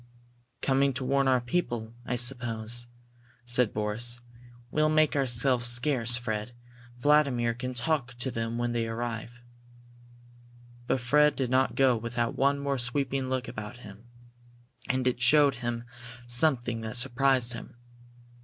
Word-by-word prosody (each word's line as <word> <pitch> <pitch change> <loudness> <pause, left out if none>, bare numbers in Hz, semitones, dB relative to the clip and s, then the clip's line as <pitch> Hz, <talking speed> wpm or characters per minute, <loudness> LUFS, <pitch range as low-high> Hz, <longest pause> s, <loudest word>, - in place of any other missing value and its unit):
"Coming 135 0 +2
to 130 0 -1
warn 135 +1 +2
our 130 -1 +4
people, 120 -4 -3
I 125 - -1
suppose," 120 -1 0 0.6
said 120 -2 +3
Boris. 115 +3 0 0.5
"We'll 155 0 +2
make 155 -1 +3
ourselves 125 -2 +2
scarce, 120 -1 +2
Fred. 110 -1 -4 0.4
Vladimir 135 -4 +2
can 125 +2 -6
talk 125 -2 -1
to 120 +2 -2
them 115 0 -3
when 120 0 -1
they 115 -1 -1
arrive." 120 +1 -5 1.5
But 130 - 0
Fred 150 +4 +3
did 130 -2 -2
not 130 +1 +2
go 130 -2 +4
without 115 +1 -2
one 140 +1 +2
more 140 -1 -2
sweeping 130 +1 -1
look 130 0 -2
about 110 +3 -7
him. 105 +3 -13 0.8
And 130 0 0
it 125 -1 0
showed 140 +3 +5
him 120 -1 -3 0.4
something 120 -2 +2
that 110 0 -2
surprised 125 0 +2
him. 120 - -9
120 Hz, 135 wpm, -28 LUFS, 120-135 Hz, 1.5 s, showed